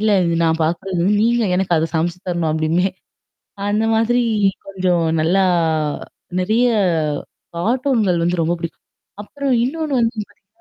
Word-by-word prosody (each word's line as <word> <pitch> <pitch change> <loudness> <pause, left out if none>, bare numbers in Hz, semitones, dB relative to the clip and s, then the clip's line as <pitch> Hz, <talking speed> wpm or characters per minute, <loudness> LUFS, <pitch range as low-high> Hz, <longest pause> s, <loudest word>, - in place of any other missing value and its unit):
இல்ல 215 0 +2 0.2
இது 170 0 0
நான் 160 0 +1
பார்கறது 175 +2 -2 0.2
நீங்க 235 +1 +2
எனக்கு 185 -2 +1
அத 160 +1 0
சமைச்சு 170 +2 -1
தரணும் 170 -3 0
அப்டிம்பேன். 165 +4 0 0.8
அந்த 210 +2 +1
மாதிரி 240 +2 +2 0.5
கொஞ்சம் 180 -3 0 0.2
நல்லா 185 +5 +2 1.0
நெறையா 225 +4 +2 0.8
கார்ட்டூன்கள் 225 -3 +1
வந்து 175 0 0
ரொம்ப 170 +2 0
பிடிக்கும். 165 -1 -7 0.4
அப்புறம் 280 +3 -2
இன்னொன்னு 300 +1 -2
வந்து 230 +1 0
பார்த்தீங்கன்னா 205 -1 -29
190 Hz, 130 wpm, -19 LUFS, 170-230 Hz, 1.0 s, இல்ல